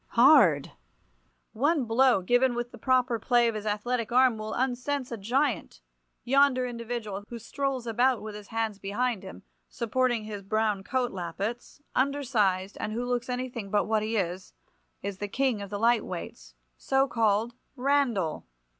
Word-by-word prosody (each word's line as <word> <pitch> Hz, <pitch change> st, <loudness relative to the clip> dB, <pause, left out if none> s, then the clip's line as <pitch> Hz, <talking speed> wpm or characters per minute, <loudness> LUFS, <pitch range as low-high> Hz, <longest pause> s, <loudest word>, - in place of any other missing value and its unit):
Hard! 275 Hz, +6 st, +6 dB, 0.8 s
One 285 Hz, +4 st, +1 dB
blow 235 Hz, -2 st, +3 dB
given 245 Hz, +4 st, +3 dB
with 240 Hz, 0 st, -3 dB
the -, -, -12 dB
proper 255 Hz, -3 st, +2 dB
play 240 Hz, +1 st, +3 dB
of 230 Hz, -, 0 dB
his 215 Hz, 0 st, -5 dB
athletic 230 Hz, +3 st, -1 dB
arm 255 Hz, -1 st, +5 dB
will 215 Hz, 0 st, -4 dB
unsense 260 Hz, +1 st, -2 dB
a -, -, -2 dB
giant. 230 Hz, -, -1 dB, 0.4 s
Yonder 270 Hz, -1 st, +3 dB
individual, 235 Hz, -4 st, -5 dB
who 235 Hz, -, -6 dB
strolls 265 Hz, +2 st, -3 dB
about 245 Hz, +2 st, +2 dB
with 215 Hz, 0 st, -7 dB
his 210 Hz, -1 st, -10 dB
hands 225 Hz, -2 st, -2 dB
behind 210 Hz, +2 st, -1 dB
him, 190 Hz, -, -10 dB, 0.3 s
supporting 240 Hz, -1 st, 0 dB
his 210 Hz, -2 st, -6 dB
brown 210 Hz, 0 st, 0 dB
coat 255 Hz, +2 st, -1 dB
lappets, 195 Hz, -, -5 dB
undersized, 235 Hz, -9 st, 0 dB
and 215 Hz, -, -3 dB
who 240 Hz, +2 st, -2 dB
looks 245 Hz, 0 st, -2 dB
anything 245 Hz, -4 st, -4 dB
but 205 Hz, +1 st, +2 dB
what 220 Hz, -1 st, +1 dB
he 220 Hz, +1 st, -1 dB
is, 180 Hz, -1 st, -3 dB, 0.5 s
is 200 Hz, -1 st, -4 dB
the 205 Hz, -, -3 dB
king 255 Hz, 0 st, 0 dB
of 200 Hz, -, -7 dB
the 205 Hz, -, -3 dB
light 230 Hz, +2 st, +3 dB
weights, 60 Hz, -7 st, -8 dB, 0.2 s
so 270 Hz, 0 st, +1 dB
called—Randall! 235 Hz, -, 0 dB
235 Hz, 155 wpm, -28 LUFS, 210-255 Hz, 0.8 s, Hard